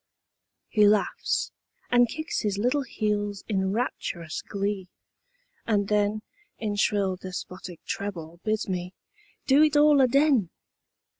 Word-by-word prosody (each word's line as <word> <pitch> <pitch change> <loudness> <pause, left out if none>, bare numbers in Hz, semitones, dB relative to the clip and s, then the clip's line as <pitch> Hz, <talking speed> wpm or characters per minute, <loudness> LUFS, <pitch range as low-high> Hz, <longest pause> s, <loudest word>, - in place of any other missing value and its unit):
He 210 -2 +4
laughs 210 0 +1 0.4
and 245 -1 +5
kicks 315 +1 -3
his 205 -2 -1
little 250 +7 +1
heels 210 -5 -2
in 190 -3 0
rapturous 175 -7 -3
glee, 200 -2 -3 0.8
and 205 -3 +1
then 210 0 +1 0.3
In 210 -2 -2
shrill, 200 -2 +1
despotic 180 -1 -8
treble 170 -4 -5
bids 215 0 -1
me 180 -1 -4 0.5
"do 275 +2 +5
it 305 -1 +4
all 295 -1 +6
aden!" 265 - +3
205 Hz, 120 wpm, -26 LUFS, 190-245 Hz, 0.8 s, all